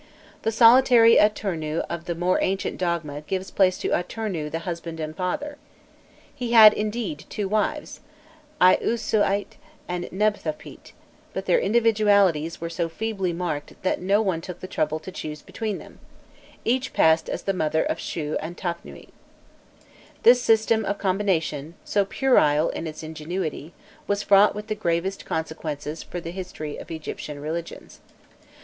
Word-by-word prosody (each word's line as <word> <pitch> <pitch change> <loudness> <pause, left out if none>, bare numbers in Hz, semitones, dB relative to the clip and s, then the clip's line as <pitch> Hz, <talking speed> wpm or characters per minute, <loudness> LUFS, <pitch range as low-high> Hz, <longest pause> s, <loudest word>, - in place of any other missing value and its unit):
The 225 - 0
solitary 230 0 +7
Atûrnû 170 -7 +1
of 170 0 -5
the 170 - -3
more 175 +2 +1
ancient 195 +1 -1
dogma 165 -5 -2
gave 190 +4 -4
place 185 -2 +3
to - - -3
Atûrnû 180 -5 -2
the 165 +2 -5
husband 170 -2 -5
and 155 0 -5
father. 285 - -3 0.8
He 245 -4 -4
had, 215 -2 +10
indeed, 210 -7 -3
two 205 -2 -3
wives, 215 +9 -1 0.6
Iûsâsît 205 +2 +2 0.3
and 180 0 -3
Nebthotpît, 195 -6 -3 0.4
but - - -4
their - - +3
individualities 205 - +3
were 170 - -4
so 170 0 -2
feebly 195 0 -2
marked 165 -4 -4
that 185 - 0
no 200 +4 +2
one 185 -5 -1
took 180 +1 -8
the - - -7
trouble 155 -3 -1
to 155 +4 -9
choose 150 -4 -7
between 215 -3 -4
them; - - -13 0.7
each 255 +2 0
passed 160 0 +3
as - - -4
the 195 - 0
mother 160 -3 +1
of - - -2
Shû 150 -2 -3
and 170 +3 -7
Tafnûîfc. 170 -1 -6 1.1
This 245 +1 +7
system 220 -1 +3
of 200 0 -2
combination, 175 -6 -1
so 200 -1 +1
puerile 165 - +3
in 165 - -4
its 155 0 -8
ingenuity, 160 0 -5 0.4
was 205 0 0
fraught 200 +1 +5
with 210 0 -6
the 215 - -2
gravest 190 -1 -2
consequences 160 -1 -4
to 175 - -6
the 170 0 -6
history 175 -5 -6
of - - -10
Egyptian 155 -2 -6
religions. 160 +3 -6
180 Hz, 150 wpm, -24 LUFS, 160-210 Hz, 1.1 s, had